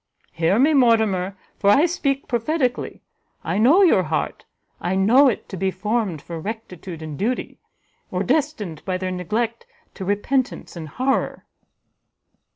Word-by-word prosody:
Hear 165 +5 +1
me, 285 +6 +4
Mortimer, 220 -7 +3 0.2
for 200 - +3
I 275 +11 +6
speak 280 -5 -1
prophetically; 250 +2 -1 0.4
I 170 +4 -1
know 295 - +6
your 325 - +5
heart, 155 -3 -3 0.3
I 180 +2 -1
know 235 +9 +5
it 245 - -1
to 190 - -6
be 190 +2 0
formed 200 -3 -2
for 170 -1 -6
rectitude 185 -4 -7
and 155 -1 -7
duty, 235 +6 -2 0.5
or 185 +1 -1
destined 245 - -1
by 185 -1 -2
their 185 0 -3
neglect 220 +6 -2 0.3
to 195 - -7
repentance 205 +7 -1
and 160 -3 -7
horror." 260 - -1
210 Hz, 145 wpm, -22 LUFS, 185-255 Hz, 0.5 s, I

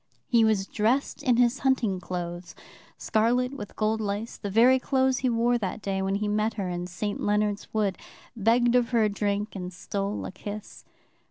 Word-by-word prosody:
He 235 -2 +4
was 215 -3 +2
dressed 225 +7 0
in 245 -3 +2
his 245 +1 +3
hunting 245 -8 +1
clothes, 175 -1 -6 0.4
scarlet 245 +4 +1
with 205 -7 -8
gold 220 +1 0
lace, 210 +2 -3
the 205 - -5
very 240 +6 +5
clothes 260 -1 +1
he 255 - +1
wore 240 +1 +2
that 200 0 -3
day 195 -2 -2
when 195 +1 0
he 210 +1 -1
met 215 +1 0
her 195 -4 -3
in 175 0 -3
St. 200 +4 -4
Leonard's 210 0 0
Wood, 205 -3 0 0.4
begged 235 +2 +3
of 245 -2 +3
her 235 -3 +3
a 215 - +3
drink, 205 +1 -2
and 180 -2 -5
stole 200 +3 -4
a - - -5
kiss. 205 +2 -8
215 Hz, 185 wpm, -27 LUFS, 200-235 Hz, 0.4 s, very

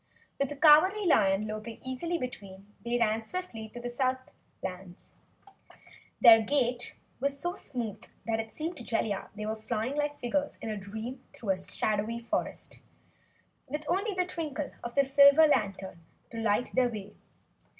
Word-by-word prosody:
With 275 -1 +1
the 290 - -5
Cowardly 320 +8 +6
Lion 195 - +4
loping 215 +1 -6
easily 260 +7 -2
between, 205 - -8
they 240 +1 0
ran 225 -1 +1
swiftly 225 -7 -6
toward 240 +2 -9
the - - -1
Southlands. 240 -8 -5 1.0
Their 225 -2 +9
gait 245 0 0 0.2
was 280 +1 -1
so 350 +4 -2
smooth 230 - -5 0.2
it 225 -1 -2
seemed 325 +7 -4
to 245 - -8
Jellia 220 -4 -1
they 210 0 -5
were 220 0 -3
flying 230 +4 -2
like 295 0 -1
figures 285 +4 -1
in 225 - -5
a - - -2
dream 220 +6 -6
through 220 - -7
the 185 - -8
shadowy 215 +2 -1
forest, 235 - -3 0.9
with 300 +3 -4
only 395 +3 0
the 365 -1 +1
twinkle 310 -5 -4
of 240 0 -6
the 280 - +5
silver 280 +3 +7
lantern 195 - 0 0.3
to 230 - -7
light 225 +2 +1
their 255 -1 +3
way. 210 -3 -7
240 Hz, 155 wpm, -30 LUFS, 215-285 Hz, 1.0 s, Their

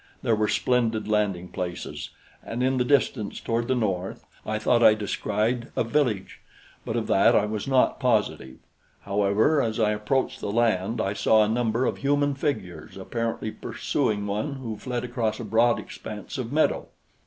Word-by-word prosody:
There 115 -4 +3
were 105 0 +1
splendid 115 -3 +1
landing 100 -4 0
places, 90 -1 -5 0.3
and 120 +2 -3
in 130 0 +2
the 125 - +2
distance, 125 -5 +1
toward 115 0 -1
the 130 - +2
north, 95 -5 -2 0.2
I 110 0 0
thought 120 +2 +2
I 110 -2 +7
descried 110 +3 -1
a - - +2
village; 115 -5 -1 0.4
but - - -3
of - - 0
that - - +4
I 105 - +4
was 105 +1 -4
not 130 -1 +3
positive. 110 - 0 0.4
However, 105 +9 +2
as 110 -2 -1
I 105 -1 +3
approached 130 +5 -1
the - - -3
land, 115 -1 +1
I 100 - 0
saw 110 +2 +4
a - - +1
number 115 +2 +1
of - - -1
human 145 +1 +1
figures 100 - -4
apparently 115 +2 -3
pursuing 105 -1 -2
one 105 +8 -2
who 125 -5 -5
fled 125 +2 -4
across 115 -3 -2
a - - -4
broad 115 +1 +3
expanse 105 +5 -7
of 120 -1 -4
meadow. 155 +2 +1
110 Hz, 170 wpm, -25 LUFS, 105-125 Hz, 0.4 s, I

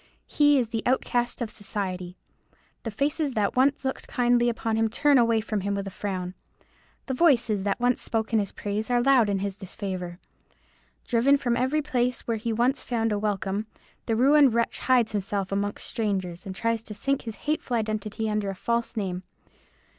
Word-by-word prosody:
He 290 -1 +4
is 240 -4 +1
the 225 -1 -2
outcast 245 -1 0
of 225 - -5
society. 185 -3 -5 0.6
The 230 - -4
faces 285 +5 -1
that 205 -2 +1
once 270 +2 +2
looked 265 - -3
kindly 240 -1 +2
on 225 -1 -2
him 225 0 +2
turn 285 +4 +4
away 230 -2 +3
from 215 -2 -2
him 200 +1 -1
with 200 0 -3
a 195 - -6
frown. 185 -2 -4 0.7
The 265 - -3
voices 250 - +3
that 200 - 0
once 245 0 +2
spoke 225 0 -2
in 220 - +5
his 200 -2 -2
praise 210 +3 -3
are 245 -1 +3
loud 245 -4 +4
in 200 - +1
his 200 0 -5
disfavour. 185 -3 -5 0.9
Driven 260 +4 +4
from 245 -4 0
every 260 +5 +1
place 250 -3 0
where 230 -2 -2
once 240 +4 +1
he - - -16
found 225 -2 0
a 205 - 0
welcome, 205 0 -2 0.4
the 225 - +1
ruined 270 +1 +5
wretch 235 0 0
hides 250 -4 +3
himself 200 -1 -2
among 200 +1 -1
strangers, 195 -5 -3
and 190 - -5
tries 230 +2 0
to 215 -1 -8
sink 275 +7 0
his 225 -3 -6
hateful 295 -5 0
identity 215 0 -2
under 210 -2 -1
a 195 - -4
false 235 +3 -1
name. 185 -3 -2
225 Hz, 185 wpm, -26 LUFS, 200-245 Hz, 0.9 s, in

